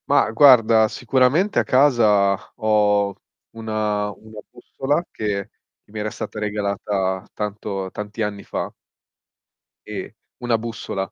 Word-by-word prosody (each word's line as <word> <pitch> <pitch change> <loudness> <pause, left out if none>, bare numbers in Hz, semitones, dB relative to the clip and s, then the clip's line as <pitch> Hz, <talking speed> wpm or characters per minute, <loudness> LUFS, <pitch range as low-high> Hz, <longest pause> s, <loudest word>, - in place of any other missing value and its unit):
Mah, - - +3
guarda, 115 -3 +6
sicuramente 130 - +2
a - - +2
casa 110 -8 +4 0.2
ho 105 -2 +2 0.4
un 115 -1 -10
una 105 -1 -1 0.4
bussola 145 +5 -2
che 100 -2 -3 0.3
che - - -25
mi 110 - -6
era 105 +1 -2
stata 110 - -6
regalata 100 -2 -2
tanto 100 -2 -4
tanti 105 +2 -6
anni 105 -2 -3
fa - - -4 1.2
E, - - -7 0.3
una 120 -2 +1
bussola. 110 -4 -5
105 Hz, 120 wpm, -21 LUFS, 100-115 Hz, 1.2 s, guarda